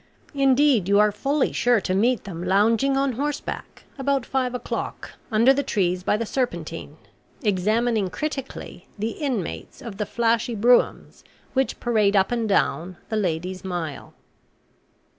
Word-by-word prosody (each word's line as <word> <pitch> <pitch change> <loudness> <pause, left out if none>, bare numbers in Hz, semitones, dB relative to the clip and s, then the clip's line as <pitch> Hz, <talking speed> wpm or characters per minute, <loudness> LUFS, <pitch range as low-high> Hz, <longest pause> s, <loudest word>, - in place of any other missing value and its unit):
Indeed 270 -7 +3
you 200 - +5
are 210 0 +5
fully 275 +7 0
sure 245 -2 +3
to 185 - -1
meet 235 +6 +2
them 175 -4 -6
lounging 225 +8 +3
on 275 0 +2
horseback, 285 +4 -4 0.2
about 270 -1 0
five 255 -2 -1
o'clock, 250 - -5 0.2
under 230 +5 +5
the 280 - 0
trees 185 -9 0
by 200 - +1
the 230 - -2
Serpentine, 170 - -3 0.5
examining 215 +1 +1
critically 275 +2 -6
the 220 +3 -2
inmates 250 - -4
of 225 -5 -8
the 210 - -2
flashy 235 0 +1
broughams 240 +4 +2 0.3
which 265 0 0
parade 215 -4 +2
up 190 +2 +3
and 230 -3 -1
down 180 -2 0
'the 220 - -1
Lady's 185 -1 -2
Mile.' 175 -5 -5
225 Hz, 140 wpm, -24 LUFS, 190-255 Hz, 0.5 s, you